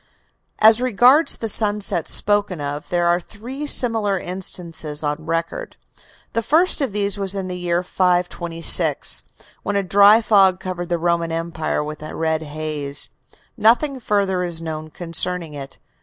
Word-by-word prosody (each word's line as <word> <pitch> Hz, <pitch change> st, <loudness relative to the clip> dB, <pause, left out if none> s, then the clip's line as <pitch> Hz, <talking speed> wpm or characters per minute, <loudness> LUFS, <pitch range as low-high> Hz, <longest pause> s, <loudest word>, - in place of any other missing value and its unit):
As 220 Hz, +2 st, +5 dB
regards 255 Hz, +6 st, +4 dB
the 225 Hz, -, -4 dB
sunsets 205 Hz, -6 st, +2 dB
spoken 205 Hz, -4 st, +1 dB
of, 145 Hz, +1 st, -5 dB
there 175 Hz, -1 st, 0 dB
are 175 Hz, 0 st, +2 dB
three 245 Hz, +10 st, -8 dB
similar 225 Hz, -7 st, +3 dB
instances 170 Hz, -5 st, -4 dB
on 150 Hz, +2 st, -4 dB
record. 165 Hz, -, -4 dB, 0.6 s
The 230 Hz, -, 0 dB
first 315 Hz, -, +2 dB
of 270 Hz, -5 st, -1 dB
these 200 Hz, 0 st, 0 dB
was 195 Hz, 0 st, +2 dB
in 190 Hz, -1 st, -4 dB
the 180 Hz, -, -5 dB
year 175 Hz, 0 st, -2 dB
526, 175 Hz, -2 st, +1 dB, 0.4 s
when 205 Hz, -, -3 dB
a 200 Hz, -, +1 dB
dry 200 Hz, +3 st, +6 dB
fog 195 Hz, -4 st, +3 dB
covered 180 Hz, -2 st, -6 dB
the 175 Hz, -, 0 dB
Roman 170 Hz, 0 st, -1 dB
Empire 165 Hz, -2 st, -3 dB
with 150 Hz, 0 st, -8 dB
a 155 Hz, -, -8 dB
red 160 Hz, -1 st, -1 dB
haze. 150 Hz, -2 st, -3 dB, 0.4 s
Nothing 250 Hz, +5 st, +2 dB
further 200 Hz, -5 st, -1 dB
is 170 Hz, -2 st, -1 dB
known 155 Hz, -1 st, -6 dB
concerning 170 Hz, 0 st, -3 dB
it. 140 Hz, -1 st, -9 dB
180 Hz, 150 wpm, -20 LUFS, 165-210 Hz, 0.6 s, dry